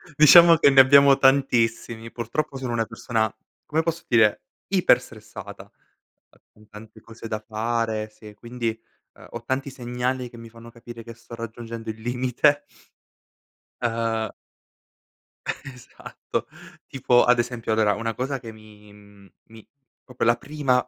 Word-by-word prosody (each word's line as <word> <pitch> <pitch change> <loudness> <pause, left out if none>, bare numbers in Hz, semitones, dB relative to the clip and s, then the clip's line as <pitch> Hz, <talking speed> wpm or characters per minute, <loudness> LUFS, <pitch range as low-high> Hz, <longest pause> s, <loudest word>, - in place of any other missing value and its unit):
Diciamo 165 +3 +8
che 150 - +5
ne 135 -1 +5
abbiamo 140 +1 +6
tantissimi. 115 -4 +1
Purtroppo 135 +5 -4
sono 130 -2 -5
una 115 -1 0
persona, 115 -1 -2 0.3
come 160 +2 0
posso 165 0 -3
dire, 110 -3 +3 0.2
iperstressata. - - -1 0.7
Ehm, - - -26
con 105 0 -22
tante 110 +1 -14
cose 115 0 -11
da 110 -1 -3
fare, 110 -1 -2
sì, 105 0 -14
quindi, 115 +2 -4 0.5
ehm, - - -15
ho 120 0 -8
tanti 135 +3 -3
segnali 125 0 -4
che 120 - -14
mi 115 0 -11
fanno 115 +1 -14
capire 115 0 -11
che 115 +1 -10
sto 115 +1 -12
raggiungendo 115 0 -8
il 110 0 -6
limite. 125 +4 +1 1.2
Ehm. 115 -2 -1 1.2
Esatto. 130 -3 -7 0.4
Tipo 125 -2 +2
ad 125 0 +4
esempio, 120 -2 -2
allora, 110 -2 +2
una 115 +2 -3
cosa 135 +3 -3
che 115 -2 -10
mi, 105 -1 -17
mhmm, 100 -1 -19 0.2
mi 110 -1 -16 0.4
proprio 125 -3 -3
la 120 - +5
prima 135 -3 -1
115 Hz, 140 wpm, -23 LUFS, 110-130 Hz, 1.2 s, Diciamo